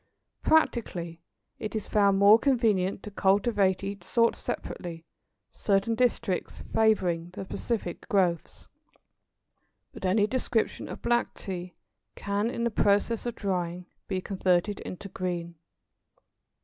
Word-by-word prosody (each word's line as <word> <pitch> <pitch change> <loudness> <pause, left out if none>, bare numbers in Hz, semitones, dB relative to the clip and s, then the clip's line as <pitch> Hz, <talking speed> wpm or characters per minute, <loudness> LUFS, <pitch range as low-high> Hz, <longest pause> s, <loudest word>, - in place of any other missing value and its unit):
Practically 175 - +1 0.4
it 215 0 -5
is 215 - -3
found 200 -2 +3
more 205 +3 +7
convenient 215 -8 +1
to 210 - -7
cultivate 195 -1 +2
each 200 0 -5
sort 230 -1 +2
separately, 165 -2 -6 0.5
certain 200 +2 +1
districts 225 -5 -1
favouring 180 -6 +2
the 190 - -6
specific 205 -2 -4
growths. 180 -6 0 1.3
But - - -11
any 200 +3 +3
description 240 -1 -1
of - - -8
black 240 0 +1
Tea 180 -2 -6 0.4
can, 200 +2 -1
in 235 -1 -3
the 235 - +1
process 210 +3 +2
of 240 - -3
drying, 180 -3 -2 0.2
be 190 -2 -2
converted 190 +1 +1
into 185 +2 -7
green. 175 -3 -4
200 Hz, 120 wpm, -28 LUFS, 180-225 Hz, 1.3 s, more